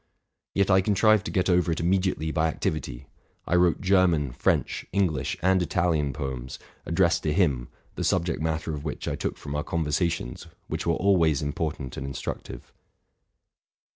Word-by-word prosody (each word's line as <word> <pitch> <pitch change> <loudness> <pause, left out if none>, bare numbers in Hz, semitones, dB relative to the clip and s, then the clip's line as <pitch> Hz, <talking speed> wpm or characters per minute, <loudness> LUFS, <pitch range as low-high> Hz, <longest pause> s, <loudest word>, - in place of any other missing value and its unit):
Yet 100 0 +2
I 95 0 +6
contrived 105 +1 +3
to - - -3
get 90 -1 +1
over 90 -2 +3
it 80 - -1
immediately 90 -2 0
by 80 +1 +1
activity. 70 -5 -3 0.4
I - - -2
wrote 90 -1 +3
German, 90 -7 +3
French, 60 - 0
English, 90 -9 0
and 95 0 +4
Italian 80 -4 +1
poems, 65 -2 -5 0.3
addressed 85 0 +2
to 75 - 0
him, 70 -9 +1 0.3
the - - -4
subject 85 -2 0
matter 80 0 -2
of 75 -1 -5
which 75 - -5
I - - -1
took - - -3
from 70 - -7
oar 75 0 -1
conversations, 80 -4 -2 0.2
which - - -4
were 85 - +3
always 85 -7 +3
important 75 -3 -3
and 70 - -4
instructive. 70 - -6
80 Hz, 160 wpm, -26 LUFS, 75-90 Hz, 0.4 s, I